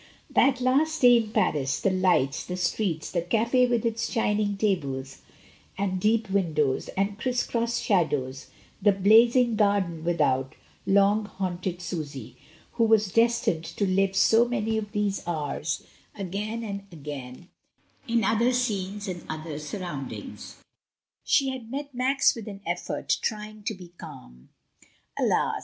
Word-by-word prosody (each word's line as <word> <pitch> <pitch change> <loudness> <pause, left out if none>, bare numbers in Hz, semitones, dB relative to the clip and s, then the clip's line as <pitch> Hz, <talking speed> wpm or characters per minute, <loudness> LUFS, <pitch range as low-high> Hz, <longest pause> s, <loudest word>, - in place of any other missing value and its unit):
That 265 -2 +3
last 285 +5 +1
day 245 -1 +8
in 225 -2 -1
Paris, 135 -9 0
the 195 - +1
lights, 180 -8 +2
the 180 - -5
streets, 180 -3 -1
the 175 - 0
caf6 235 +7 +2
with 240 -1 0
its 230 0 -1
shining 210 -3 0
tables 140 -10 -2 0.6
and 190 -1 -1
deep 220 +1 +2
windows 155 -8 +1
and 200 +2 -1
criss 245 0 0
cross 235 0 -1
shadows, 135 -9 0 0.3
the 205 +1 +5
blazing 230 +5 +5
gardens 200 -6 +1
without, 140 -6 +1 0.3
long 200 +2 +4
haunted 180 -2 -4
Susy, 140 - -6 0.4
who 230 -1 +2
was 215 -3 +3
destined 230 -8 +2
tc 185 +3 -1
live 195 0 +2
so 225 +4 +5
many 225 -2 -1
of 210 -1 -3
these 205 -1 -1
hours 155 -1 -2 0.3
again 210 +4 -4
and 200 -2 -6
again, 145 0 -8 0.6
in 230 -1 +1
other 230 +5 +2
scenes 205 -4 -2
and 180 -2 -5
other 155 -1 -5
surroimdings. 150 -3 -7 0.7
She 275 -2 +2
had 255 -4 -6
met 280 +2 -5
Max 260 +2 +3
with 225 -2 -8
an 200 -1 -8
effort, - - -2
trying 215 0 -4
to 220 - -2
be 180 -2 -12
calm. 60 +1 -12 0.7
Alas! - - +1
200 Hz, 140 wpm, -26 LUFS, 170-225 Hz, 0.7 s, day